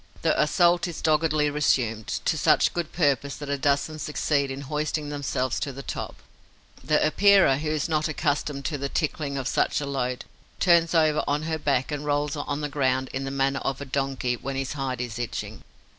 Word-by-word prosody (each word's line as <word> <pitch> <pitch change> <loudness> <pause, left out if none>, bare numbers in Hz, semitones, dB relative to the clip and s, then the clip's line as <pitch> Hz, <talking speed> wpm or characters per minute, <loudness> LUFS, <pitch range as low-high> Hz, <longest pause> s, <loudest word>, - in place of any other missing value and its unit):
The - - +3
assault 175 +3 +3
is 170 - -6
doggedly 155 -1 +2
resumed, 120 -7 +1 0.2
to - - +2
such - - +3
good 170 -2 -3
purpose 140 -4 +1
that 145 -1 -6
a 140 - 0
dozen 145 +3 0
succeed 145 -1 0
in 135 +1 -5
hoisting 150 +1 -2
themselves 135 -3 -2
to 140 - -3
the 135 +1 -8
top. - - -6 0.6
The 150 0 +2
Epeira, 195 -3 +5
who 155 0 -2
is 155 0 0
not 155 -1 +1
accustomed 145 -2 -1
to 145 -3 -2
the 140 0 -2
tickling 145 -2 -2
of 135 -1 -2
such - - +1
a 145 - -3
load, 125 -3 -2 0.3
turns 170 -1 +4
over 155 -2 +3
on 145 +1 0
her 160 0 -2
back 140 -2 0
and 145 0 -3
rolls 145 0 0
on 145 0 -3
the 150 - -1
ground 130 -2 0
in 135 0 -3
the - - -3
manner 135 0 0
of 135 -1 -3
a 140 - -6
donkey 135 -2 -1
when 135 +3 -5
his 135 +1 -2
hide 135 -4 -3
is 120 -1 -5
itching. 120 -2 -5
145 Hz, 200 wpm, -25 LUFS, 135-155 Hz, 0.6 s, Epeira